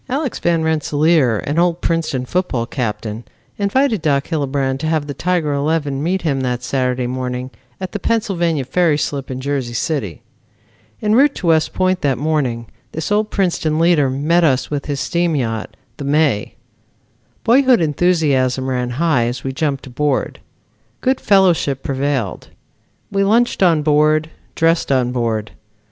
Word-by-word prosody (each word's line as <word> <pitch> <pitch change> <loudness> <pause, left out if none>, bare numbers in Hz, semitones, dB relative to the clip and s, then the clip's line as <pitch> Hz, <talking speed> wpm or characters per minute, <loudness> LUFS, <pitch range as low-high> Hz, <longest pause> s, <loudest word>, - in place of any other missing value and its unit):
Alex 270 0 -2
Van 170 -2 +1
Rensselaer, 155 -5 +2
an 150 +4 0
old 175 -1 +2
Princeton 160 -8 -1
football 130 -7 -1
captain, 115 -2 -4 0.4
invited 220 - +1
Doc 140 -3 0
Hillebrand 140 -4 -1
to 155 - -2
have 155 -2 0
the 145 - -5
Tiger 165 0 0
eleven 145 -1 -1
meet 180 +4 -1
him 140 -5 0
that 125 -1 -2
Saturday 125 -1 -1
morning 125 0 -4 0.3
at 185 -1 -5
the 205 - -4
Pennsylvania 175 - 0
Ferry 160 +3 +2
slip 140 -2 -3
in 130 -1 -4
Jersey 130 -3 -3
City. 115 - -3 0.8
En 210 0 +2
route 280 +4 +4
to - - -6
West 160 -2 +3
Point 185 0 +1
that 135 -4 +1
morning 135 -5 -1 0.3
this 160 +4 -4
old 210 +1 +1
Princeton 170 -5 0
leader 165 -4 +3
met 155 +6 +1
us 135 -4 +1
with 145 -2 -3
his 145 -2 -2
steam 170 0 0
yacht, 115 -5 -3 0.2
The - - -6
May. 140 -7 +1 0.9
Boyhood 255 0 +4
enthusiasm 145 -6 +1
ran 125 -1 -1
high 155 -7 +2
as 120 +1 -4
we 135 - -3
jumped 145 -2 -2
aboard. 135 +2 -1 0.6
Good 260 0 +1
fellowship 175 -9 +3
prevailed. 135 - -2 0.6
We 195 0 +1
lunched 230 +4 +2
on 165 -5 +4
board, 155 +1 +2 0.2
dressed 165 -2 +2
on 125 -2 +2
board. 115 -4 -2
150 Hz, 155 wpm, -18 LUFS, 130-170 Hz, 0.9 s, route